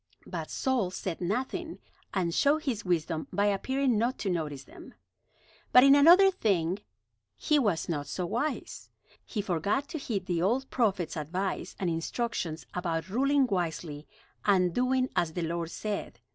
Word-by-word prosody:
But - - -5
Saul 255 -9 0
said 185 -1 -5
nothing, 260 - -2 0.3
and 175 -4 -1
showed 300 - +3
his 230 -6 -2
wisdom 165 -3 -1
by 205 - +1
appearing 250 +4 +1
not 240 +4 0
to 195 - +1
notice 150 -5 -3
them. - - -14 0.8
But 250 - +8
in 275 0 +8
another 345 +7 +7
thing 195 - 0 0.6
he 300 -1 +2
was 205 - 0
not 145 -4 -2
so 180 +5 -3
wise. 245 - -3 0.3
He 210 -4 -4
forgot 200 - 0
to 320 - -4
heed 205 -8 -3
the 175 -2 -1
old 245 +9 +1
prophet's 200 -8 0
advice 180 +5 -3
and 185 - -1
instructions 165 0 -2
about 170 -1 -2
ruling 275 +5 +3
wisely 165 -7 -3 0.4
and 185 -4 +3
doing 255 +2 +2
as 160 -2 +1
the 175 - -2
Lord 165 0 -2
said. 210 +3 -4
195 Hz, 155 wpm, -29 LUFS, 170-255 Hz, 0.8 s, But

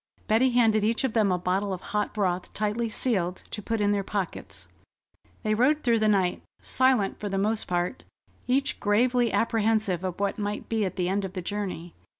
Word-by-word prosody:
Betty 230 +4 +4
handed 225 -3 +3
each 225 +5 +1
of 265 - 0
them 215 -4 +3
a 180 - +2
bottle 185 +3 -1
of 185 -1 -4
hot 210 0 0
broth 185 -4 -1
tightly 215 +2 -1
sealed, 190 -6 -1
to 210 - -5
put 225 +2 -2
in 205 0 +2
their 200 -1 0
pockets. 195 -2 -5 0.8
They 215 -1 +1
rode 270 +7 +2
through 235 -2 +3
the 215 - +2
night, 190 -4 +2 0.2
silent 255 -6 +1
for 205 - -4
the 195 - -2
most 215 +3 0
part, 175 +7 -2 0.4
each 275 +3 0
gravely 240 +3 +2
apprehensive 220 -5 +1
of 185 -1 -4
what 200 +1 -1
might 205 0 -3
be 220 -2 +1
at 185 - -4
the 180 -1 -1
end 195 +2 0
of 190 -1 -5
the 185 - -4
journey. 185 -4 -4
210 Hz, 195 wpm, -27 LUFS, 190-225 Hz, 0.8 s, Betty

